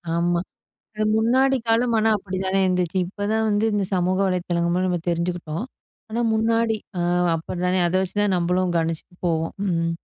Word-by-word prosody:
ஆமா. 170 0 +1 0.6
அது 215 - -1
முன்னாடி 260 +4 +3
காலம் 230 +1 +2
ஆனா, 220 +1 +3
அப்படி 190 -1 -5
தானே 190 +1 +1
இருந்துச்சு. 180 -1 0
இப்ப 205 +2 -5
தான் 220 0 +1
வந்து, 205 +1 +2
இந்த 205 -1 +1
சமூக 185 0 +1
வலைத்தளங்கள் 175 -2 0
மூலமா 185 +1 +1
நம்ம 175 -1 0
தெரிஞ்சுக்கிட்டோம். 170 +2 -2 0.4
ஆனா, 235 +2 -1
முன்னாடி 225 0 +2 0.2
ஆ - - 0 0.3
அப்படி 165 +2 -5
தானே 185 +1 +2
அதை 185 +2 +1
வச்சு 190 +1 -4
தான் 200 -3 +2
நம்மளும் 180 +1 +1
கணிச்சுட்டு 165 +1 -3
போவோம். 165 -1 0
ம். 165 -2 0
185 Hz, 175 wpm, -23 LUFS, 175-215 Hz, 0.6 s, முன்னாடி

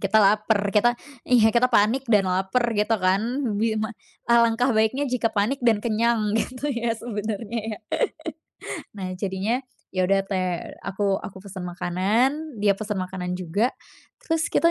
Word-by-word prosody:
kita 220 - +2
laper, 205 0 +3
kita 240 +4 +3 0.3
iya 230 -3 +5
kita 235 +2 +4
panik 250 +3 +2
dan 205 -5 +3
laper 190 +6 +1 0.2
gitu 215 +2 +2
kan 185 -1 +2 0.4
bi 220 +1 +1
ma 220 +1 -2 0.4
alangkah 235 +2 +4
baiknya 220 +4 +2
jika 240 -2 0
panik 215 +7 +1
dan 220 -3 +3
kenyang 225 -1 +1
gitu 255 +5 -2
ya 235 -3 -1
sebenernya 220 0 -4 0.2
ya. - - -13 1.2
Nah 190 -2 -5
jadinya 195 +5 -1 0.3
ya 185 -1 +1
udah 195 +1 +3
te 195 -1 -2 0.5
aku 195 0 0
aku 190 -2 -9
pesen 190 -2 -7
makanan, 215 - 0
dia 200 -1 +3
pesen 215 -1 -3
makanan 180 -1 -4
juga 185 +7 -1 0.5
terus 325 0 0
kita 335 - +3
215 Hz, 150 wpm, -24 LUFS, 195-235 Hz, 1.2 s, iya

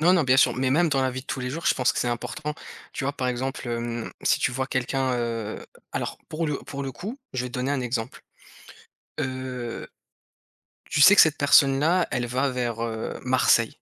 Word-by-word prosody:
Non, 175 +3 +5
non, 175 - +4
bien 130 -2 +3
sûr, 135 - +5
mais 130 0 +1
même 165 +5 +3
dans 135 -3 +1
la 130 - +1
vie 130 +1 -5
de 135 - -19
tous 130 - -3
les 125 0 -3
jours, 165 +5 -5
je - - +4
pense 130 - +2
que - - -4
c'est 120 - 0
important. 145 +5 -4 0.4
Tu - - -4
vois, 140 - 0
par 130 -2 -2
exemple, 130 +1 -3
hem, 120 -1 -3
si - - +3
tu 120 - +1
vois 130 +1 -2
quelqu'un, 130 0 -1
heu, 115 -3 -3 0.3
alors - - -3
pour 160 +1 -2
le 150 -2 -1
pour 140 -1 -7
le 135 - -3
coup, 210 - -7 0.2
je 125 - -1
vais 125 - -4
te - - -16
donner 130 +2 -1
un 145 - 0
exemple, 120 -1 -4 1.0
heu, 130 -2 -4 1.0
tu - - 0
sais 195 +7 +9
que - - +9
cette 160 -2 +4
personne-là, 145 +5 +4
elle 120 -1 -1
va 130 +3 0
vers, 120 -3 -2
heu, 115 -1 -4
Marseille. 125 -3 +3
130 Hz, 220 wpm, -25 LUFS, 120-140 Hz, 1.0 s, sais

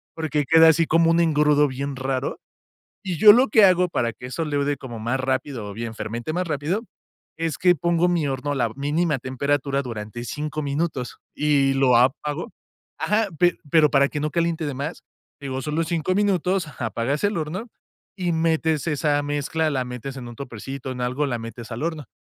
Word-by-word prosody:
porque, 155 -2 -1
queda 165 0 +8
así 165 +1 +3
como 165 +1 +4
un 165 - +3
engrudo 150 -3 +3
bien 140 +1 -4
raro, 130 0 -2 0.7
y 180 -4 -3
yo 210 +4 +10
lo 250 +3 +4
que 215 0 +6
hago 180 -1 +3
para 120 -8 -1
que 125 - -9
eso 130 +6 -3
leude 145 -1 0
como 120 -4 -8
más 120 +4 -1
rápido 130 -3 -2
o - - -8
bien 115 +1 -5
fermente 115 +6 -4
más 180 +1 -2
rápido, 155 +7 -1 0.6
es 165 -1 -2
que 180 -1 +5
pongo 170 +3 +2
mi 170 -4 +1
horno 135 +1 -2
a - - -1
la 120 -3 +1
mínima 150 +2 0
temperatura 140 +2 -1
durante 115 -1 -6
5 150 +4 -4
minutos 140 -3 -3 0.2
y 140 -2 +2
lo 135 -2 +4
apago 145 +5 +1 0.5
Ajá, 210 0 +1
pe 175 0 +3
pero 155 -1 +5
para 140 -1 +4
que 150 - -4
no 150 +1 -1
caliente 165 +1 0
de 145 - -3
más, 140 +5 -5 0.4
digo, 135 -2 -4
solo 155 +3 -1
5 170 +2 -1
minutos, 190 -3 +1
ajá, 140 -5 -5
apagas 120 +6 -2
el 205 0 +1
horno 170 +9 -4 0.5
y 180 -3 -1
metes 160 -1 +1
esa 145 -1 +1
mezcla, 145 +2 -1
la 130 -3 -1
metes 125 +2 -7
en 125 -2 -7
un 120 - -9
topercito, 135 +1 -7
en 125 -1 -6
algo, 125 +4 -1
la 120 -4 -2
metes 115 0 -8
al 120 +6 -4
horno. 160 -4 -3
145 Hz, 195 wpm, -23 LUFS, 130-165 Hz, 0.7 s, yo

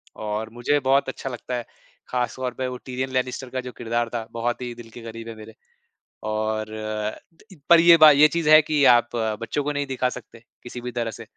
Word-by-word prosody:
और 110 +1 -4
मुझे 135 +5 +1
बहुत 135 +1 +2
अच्छा 135 - -6
लगता 125 0 -5
है, 120 - -4 0.4
खास 125 -2 -2
तौर 130 -1 -3
पे 130 0 -3
वो 125 0 -5
टिरियन 130 0 -3
लैनिस्टर 130 0 -2
का 130 0 -3
जो 125 0 -8
किरदार 120 0 -1
था, 115 -1 -4
बहुत 120 +2 -2
ही 120 -1 -5
दिल 120 -1 -12
के 120 - -11
करीब 115 0 -8
है 115 - -8
मेरे। 110 +1 -12 0.8
और 110 0 -1 0.7
त - - -23
इ - - -12
पर 170 -1 +8
ये 170 0 +8
बा 155 -1 +9
ये 145 +2 +6
चीज़ 165 -1 -1
है 155 0 +9
कि 150 -1 0
आप 120 -1 +5 0.3
बच्चों 145 +5 -2
को 150 - -1
नहीं 145 0 -2
दिखा 130 -1 -1
सकते 115 - -11 0.2
किसी 120 0 -8
भी 125 0 -5
तरह 115 -2 -3
से, 115 - -10
125 Hz, 225 wpm, -23 LUFS, 115-135 Hz, 0.8 s, बा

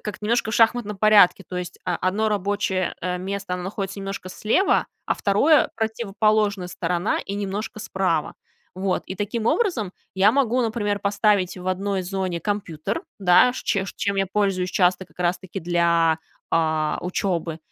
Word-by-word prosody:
как-то 210 0 -6
немножко 230 0 +1
в - - -2
шахматном 225 -2 +2
порядке. 205 -2 +5
То 180 - -4
есть 180 - -6
о 180 -2 0
одно 205 +4 0
рабочее, 200 -2 -1
э, 180 0 -2
место 200 +2 -5
там 180 0 -5
находится 195 0 -4
немножко 195 -1 -6
слева, 230 - +2 0.2
а - - +2
2- 275 +10 +3
противоположная 215 -3 0
сторона 175 +3 -1
и 200 - -4
немножко 205 +2 -4
справа. 190 -7 -1 0.4
Вот. 185 0 -1
И 190 - -5
таким 215 +3 -3
образом 290 - +1 0.2
я 195 +3 +5
могу, 255 -2 +2
например, 215 -3 -1
поставить 200 -2 +1
в 180 - -9
одной 190 +1 -1
зоне 185 -2 -3
компьютер, 200 -4 -3 0.2
да, 190 +6 +5
ш - - -6
чем 195 -2 0
ш - - -8
чем 200 -1 -1
я 195 0 +1
пользуюсь 195 -3 0
часто 180 -1 +2
как-раз-таки 180 +1 -3
для, 170 -1 +2 0.3
а, 155 -2 +1
учебы. 175 -3 -2
195 Hz, 160 wpm, -23 LUFS, 180-210 Hz, 0.4 s, порядке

